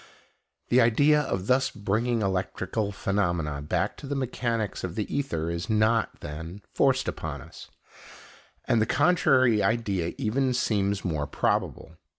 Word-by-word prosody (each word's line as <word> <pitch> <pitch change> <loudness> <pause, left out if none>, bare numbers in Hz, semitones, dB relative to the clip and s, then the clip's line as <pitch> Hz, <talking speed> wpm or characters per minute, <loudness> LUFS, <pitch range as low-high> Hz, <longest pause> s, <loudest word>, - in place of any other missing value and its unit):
The 125 +1 +5
idea 145 +6 +4
of 95 -10 -3
thus 130 +3 +2
bringing 110 +3 -1
electrical 95 +2 -2
phenomena 85 -8 -1
back 75 - -1
to 140 - -9
the 140 - -2
mechanics 120 -5 -2
of 90 -1 -4
the 105 - -1
ether 85 - -1
is 85 +4 -4
not, 110 +1 +1
then, 80 +6 -7
forced 135 -1 +2
upon 75 -2 -4
us, - - -12 1.0
and 110 - +2
the 110 - +1
contrary 130 -10 +3
idea 100 -5 0
even 130 +3 0
seems 100 -4 0
more 75 -5 -1
probable. 80 - -2
105 Hz, 140 wpm, -27 LUFS, 90-120 Hz, 1.0 s, The